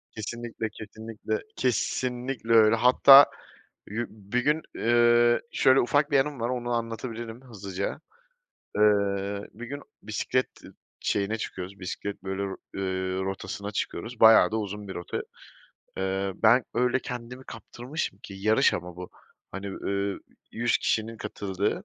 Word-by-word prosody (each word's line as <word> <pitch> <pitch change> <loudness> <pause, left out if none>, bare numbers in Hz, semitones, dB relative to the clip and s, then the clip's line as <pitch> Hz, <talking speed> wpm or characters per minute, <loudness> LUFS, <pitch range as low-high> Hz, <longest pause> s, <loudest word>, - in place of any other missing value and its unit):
Kesinlikle, 115 +1 -4
kesinlikle, 110 0 -5
kesinlikle 125 0 -1
öyle. 110 0 +7
Hatta 135 +4 +8 0.6
yu 115 +3 -3
bir 105 +3 -3
gün, 150 +3 +2
eee, 120 0 +4
şöyle 130 0 +5
ufak 145 +4 +2
bir 140 - +5
anım 140 0 -1
var, 115 +1 -1
onu 120 -1 -3
anlatabilirim 115 0 -4
hızlıca. 100 -6 -5 0.8
Iıı, 100 -1 +2
bir 120 +3 -8
gün 140 +3 -6 0.2
bisiklet 110 +4 0 0.2
ı - - -13 0.3
şeyine 105 +2 0
çıkıyoruz, 95 -2 -6
bisiklet 100 +2 -5
böyle, 95 0 -3 0.3
r - - -6
ııı, 95 0 -2
rotasına 95 +1 -4
çıkıyoruz. 115 +4 -4
Bayağı 110 0 +8
da 110 - +1
uzun 105 -1 -5
bir 95 - -6
rota. 90 - -4 0.8
Iıı, 95 +1 -1
ben 120 +2 +6
öyle 125 +2 +2
kendimi 125 +1 -7
kaptırmışım 120 - -6
ki 100 - -9
yarış 110 +3 +3
ama 90 0 -6
bu, 90 0 -8 0.4
hani, 95 +1 -5
ııı, 100 0 -2 0.3
100 120 +1 +1
kişinin 115 +1 -1
katıldığı, 105 - -3
110 Hz, 135 wpm, -27 LUFS, 100-120 Hz, 0.8 s, Hatta